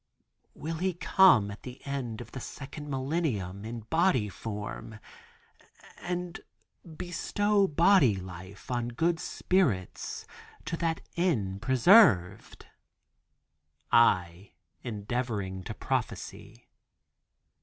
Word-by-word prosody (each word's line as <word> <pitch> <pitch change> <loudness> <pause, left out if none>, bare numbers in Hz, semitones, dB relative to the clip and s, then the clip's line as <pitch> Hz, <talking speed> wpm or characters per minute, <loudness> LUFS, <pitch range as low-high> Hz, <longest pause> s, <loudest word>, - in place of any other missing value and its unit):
"Will 160 +1 -5
He 185 +1 -1
come 170 - +5
at 100 - -10
the 125 0 -9
end 130 -5 -4
of 115 -1 -11
the 135 - -6
second 145 +3 -8
millennium 130 - -2
in 115 +1 -6
body 130 - +1
form 105 +2 -7 1.0
and 175 0 -4 0.6
bestow 200 +3 +1
body 165 - +4
life 95 +3 -9
on 120 -1 -1
good 165 +8 0
spirits 135 - -1 0.4
to - - -2
that 165 -1 -1
end 110 - 0
preserved?" 115 - +4 1.3
I, 90 -5 +3 0.3
endeavoring 105 -4 -3
to - - -6
prophecy. - - -4
125 Hz, 95 wpm, -29 LUFS, 100-170 Hz, 1.3 s, come